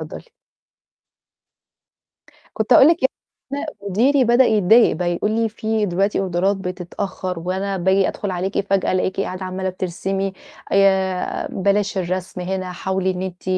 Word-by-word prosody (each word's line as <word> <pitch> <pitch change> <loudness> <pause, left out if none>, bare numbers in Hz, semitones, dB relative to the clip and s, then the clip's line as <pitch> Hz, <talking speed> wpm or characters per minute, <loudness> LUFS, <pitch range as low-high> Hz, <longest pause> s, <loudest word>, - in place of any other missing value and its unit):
اتفضّلي. - - -8 2.3
كنت - - +2
هأقول 270 - +8
لِك 335 - +4
يعني 265 - +3 0.4
أنا 285 - -2 0.2
مديري 260 +8 +3
بدأ 240 +2 +4
يتضايق 220 0 +4
بقى 175 +1 -1
يقول 210 +5 -1
لي: 225 0 +1
"في 220 0 -1
دلوقتي 195 +2 0
أوردرات 190 +1 0
بتتأخّر 185 0 -5
وأنا 190 +3 -2
باجي 190 +1 +2
أدخل 200 -2 -4
عليكِ 185 +2 -2
فجأة 195 -1 +2
ألاقيكِ 185 +1 -1
قاعدة 185 0 -4
عمّالة 185 0 -3
بترسمي، 190 +1 -3 0.4
آآ 190 -2 +2
بلاش 200 +1 0
الرسم 185 0 -3
هنا 185 0 -3
حاولي 190 +1 -1
إن 180 0 -5
أنتِ 185 -1 -6
190 Hz, 140 wpm, -20 LUFS, 185-205 Hz, 2.3 s, هأقول